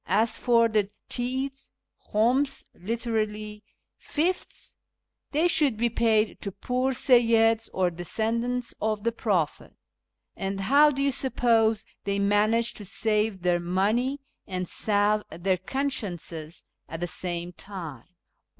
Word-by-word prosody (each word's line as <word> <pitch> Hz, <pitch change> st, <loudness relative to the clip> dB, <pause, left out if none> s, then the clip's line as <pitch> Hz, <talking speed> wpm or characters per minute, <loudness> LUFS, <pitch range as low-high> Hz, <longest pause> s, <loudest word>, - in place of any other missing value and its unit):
^ -, -, -59 dB
As 220 Hz, +5 st, +3 dB
for 235 Hz, -1 st, +3 dB
the 210 Hz, -3 st, 0 dB, 0.2 s
Tithes 265 Hz, +2 st, -2 dB, 0.4 s
{khums, 250 Hz, +6 st, +2 dB
literally 215 Hz, 0 st, -3 dB, 0.2 s
" -, -, -56 dB, 0.2 s
fifths 345 Hz, +5 st, -1 dB, 0.3 s
"), -, -, -58 dB
they 310 Hz, +4 st, +3 dB
should 295 Hz, -9 st, +3 dB
be 235 Hz, +1 st, +1 dB
paid 220 Hz, -2 st, +1 dB
to 200 Hz, -, -4 dB
poor 250 Hz, +7 st, -1 dB
Seyyids 230 Hz, -3 st, +4 dB
or 185 Hz, -1 st, +1 dB
descendants 230 Hz, +8 st, -1 dB
of 215 Hz, -1 st, -1 dB
the 230 Hz, -, +1 dB
Prophet. 190 Hz, -, -1 dB, 0.6 s
And 195 Hz, 0 st, -3 dB
how 285 Hz, +9 st, +5 dB
do 275 Hz, -1 st, -1 dB
you 280 Hz, -, +2 dB
suppose 225 Hz, -4 st, +2 dB, 0.2 s
they 200 Hz, 0 st, 0 dB
manage 210 Hz, +3 st, +2 dB
to 210 Hz, -, -8 dB
save 210 Hz, -1 st, 0 dB
their 175 Hz, -1 st, +2 dB
money 210 Hz, +10 st, 0 dB, 0.3 s
and 185 Hz, -2 st, -3 dB
salve 210 Hz, +2 st, +2 dB
their 185 Hz, +2 st, -1 dB
consciences 185 Hz, -, -4 dB, 0.3 s
at 165 Hz, -, -6 dB
the 175 Hz, -, -2 dB
same 175 Hz, 0 st, -3 dB
time 170 Hz, -, -8 dB
220 Hz, 130 wpm, -26 LUFS, 195-245 Hz, 0.6 s, how